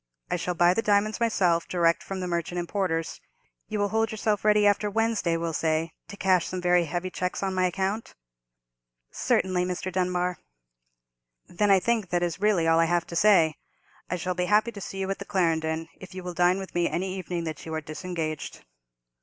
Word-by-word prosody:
I - - +2
shall 180 0 -2
buy 175 +1 +5
the 225 - 0
diamonds 210 +1 +2
myself, 180 -8 +2
direct 170 -2 +2
from 195 -1 -5
the 180 - -3
merchant 170 0 -2
importers. 175 -2 -2 0.5
You 215 - -3
will 205 0 +1
hold 225 +1 +1
yourself 215 -1 -1
ready 210 -1 +4
after 205 +1 +3
Wednesday, 220 -5 +1
we'll 165 0 -3
say, 160 +1 0 0.2
to 200 - -10
cash 185 -3 +2
some 185 - -4
very 180 -1 +3
heavy 175 +3 -3
cheques 180 +2 -3
on 190 -1 -1
my 185 0 +2
account?" 195 +5 -3 1.0
"Certainly, 185 -1 +1
Mr. 180 +1 -3
Dunbar." 180 -1 -1 1.1
"Then 205 +4 0
I 195 -1 +6
think 220 -1 0
that 175 0 0
is 175 +1 -2
really 200 -6 +3
all 165 0 +4
I 165 - +5
have 175 0 +1
to 170 - -8
say. 170 -5 +4 0.5
I 180 - 0
shall 180 +1 -2
be 180 0 -1
happy 210 +4 +3
to 200 - -9
see 195 - -6
you 190 0 -2
at 195 - -4
the - - -5
Clarendon, 165 -4 0
if 185 -1 -11
you 185 - -6
will 180 0 -5
dine 180 +1 +3
with 195 -1 -7
me 175 -1 +1
any 185 +2 -2
evening 180 -2 -4
that 155 -2 -5
you 160 - -5
are 160 - -2
disengaged." 155 0 -5
180 Hz, 205 wpm, -26 LUFS, 170-200 Hz, 1.1 s, I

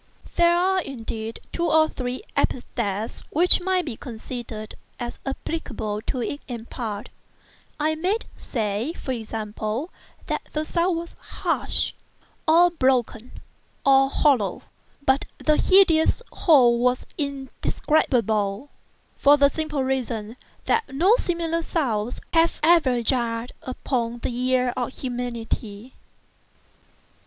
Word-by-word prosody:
There 345 0 +5
are, 375 +1 +2
indeed, 225 -5 -5
two 340 0 0
or 315 0 +5
three 255 +2 -4
epithets 220 -4 -1
which 350 +4 +4
might 370 -1 +1
be 270 -7 -4
considered 225 -2 -7 0.3
as 240 -1 -5
applicable 245 -7 -3
to 250 -2 -1
it 285 - -4
in 235 -4 -6
part; 215 -5 -5 0.7
I 310 +1 +2
might 370 +8 -1
say, 220 +4 -2
for 265 - -5
example, 220 - -4 0.3
that - - -2
the 305 0 -1
sound 340 +1 +1
was 335 0 -7
harsh, - - -1 0.5
and 340 +1 +5
broken 250 -2 +1 0.5
and 270 0 +5
hollow; 250 - +2 0.4
but 265 +1 +3
the 305 -1 +2
hideous 370 +1 +4
whole 250 -6 +5
is 250 - -8
indescribable, 265 -5 0 0.5
for 285 +1 +6
the 280 -1 +5
simple 305 -3 -2
reason 235 -4 -2 0.3
that 455 -10 +1
no 355 - +4
similar 335 -4 -1
sounds 245 -9 -1
have 330 0 +3
ever 305 -8 +4
jarred 235 -1 -1
upon 240 -2 -2
the 240 - -2
ear 250 0 +1
of 250 0 -2
humanity. 240 -2 -4
260 Hz, 115 wpm, -24 LUFS, 230-315 Hz, 0.7 s, for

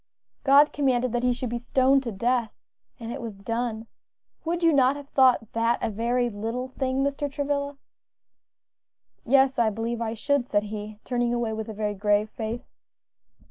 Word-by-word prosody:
"God 285 +2 +6
commanded 255 -4 +1
that 240 0 0
he 250 0 +2
should 245 -1 -3
be 240 - -2
stoned 265 +3 +3
to 240 -3 -4
death, 235 +2 0 0.5
and 230 0 -6
it 265 +2 -5
was 225 -4 -6
done. 230 0 -2 0.6
Would 340 +1 -2
you 330 -1 +5
not 265 -1 +4
have 285 -1 -10
thought 255 -5 +3
that 230 +1 +2
a - - -2
very 240 +3 0
little 230 +4 -4
thing, 265 0 -1
Mr. 280 0 -2
Travilla?" 285 0 -2 1.5
"Yes, 270 0 +4
I 230 -2 +4
believe 230 +2 -3
I 225 0 -2
should," 280 +2 0
said 205 -3 +1
he, 210 0 -6
turning 240 -1 0
away 235 -2 -1
with 220 0 -5
a - - -5
very 210 0 -1
grave 205 +1 +1
face. 230 +2 -6
240 Hz, 175 wpm, -26 LUFS, 225-270 Hz, 1.5 s, God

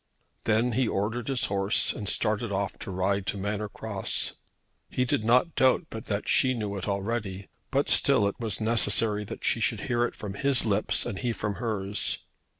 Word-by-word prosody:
Then 115 +3 +2
he 125 +1 +1
ordered 110 +4 -2
his 135 -3 +1
horse, 100 +1 +1
and 100 -3 -4
started 105 +1 0
off 100 -1 -2
to - - -7
ride 95 +1 -1
to - - -1
Manor 105 +1 -3
Cross. 100 -2 -2 0.6
He 125 - 0
did 140 -3 0
not 125 +9 +3
doubt 130 +6 +3
but 110 0 -7
that 100 -1 -2
she 130 -1 +4
knew 105 -3 -3
it 95 0 -5
already, 100 -1 -3 0.2
but - - +1
still 100 - +6
it 100 - -4
was 110 -5 -2
necessary 110 -1 +2
that - - -7
she - - +2
should - - 0
hear 120 0 0
it - - -5
from 100 -2 -6
his 135 +4 +2
lips 105 -1 +1
and 95 - -4
he 125 - -1
from 105 -3 -3
hers. 105 -4 -2
105 Hz, 190 wpm, -27 LUFS, 100-120 Hz, 0.6 s, still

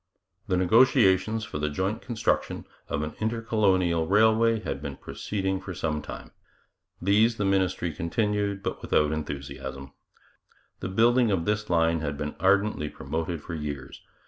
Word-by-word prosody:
The 90 - +1
negotiations 110 +1 +4
for 105 -8 -5
the 75 0 0
joint 95 +8 -2
construction 120 -3 -1 0.2
of 75 - -1
an 75 - -4
intercolonial 100 -7 +1
railway 110 +3 +4
had - - -4
been - - -5
proceeding 95 -2 -3
for 95 -1 -7
some 75 -2 -2
time. - - -9 0.7
These 110 +4 +3
the 105 - 0
ministry 95 -3 +1
continued, 100 +4 -1
but - - -3
without 75 0 +2
enthusiasm. 70 -2 -5 0.9
The - - -4
building 115 +4 +4
of 90 -5 0
this 105 0 -1
line 85 -1 +2
had 75 -2 -3
been 75 +1 -3
ardently 100 -5 +2
promoted 80 0 -4
for - - -7
years. 75 -3 -6
95 Hz, 145 wpm, -27 LUFS, 80-110 Hz, 0.9 s, negotiations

